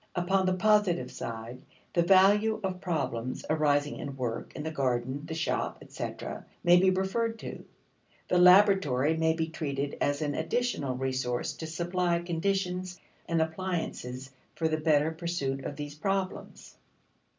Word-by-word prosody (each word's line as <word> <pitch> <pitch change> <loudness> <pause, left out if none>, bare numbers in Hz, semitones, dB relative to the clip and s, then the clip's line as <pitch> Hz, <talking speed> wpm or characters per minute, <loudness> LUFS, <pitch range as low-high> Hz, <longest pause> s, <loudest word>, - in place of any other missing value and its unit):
1 175 -1 -1
Upon 190 +1 +2
the 185 - +2
positive 185 -10 +2
side, 115 +2 -6 0.3
the 170 - +3
value 205 +5 +5
of 185 -1 -3
problems 130 -8 -2
arising 145 -2 +2
in 140 -2 -6
work 120 -3 -3
in 150 - -5
the 160 - -3
garden, 130 -1 -1
the 160 - -4
shop, 160 - -1
etc., - - -6 0.2
may 175 0 +7
be 190 +1 +5
referred 210 +5 0
to - - -11
(See - - -3
p. - - -8
200). - - -16 0.6
The 180 - +3
laboratory 180 -6 +5
may 160 0 +3
be 160 0 -2
treated 140 -3 -3
as 145 +2 +1
an 145 -1 -1
additional 160 - -1
resource 130 -2 -1
to 160 - -5
supply 175 +1 0
conditions 180 +1 -2 0.3
and 165 -1 +2
appliances 160 -7 -4 0.2
for 160 - 0
the 155 0 0
better 155 -1 +2
pursuit 160 -5 -3
of 145 - -5
these 145 0 -6
problems. 190 +4 -3
160 Hz, 160 wpm, -29 LUFS, 140-185 Hz, 0.6 s, may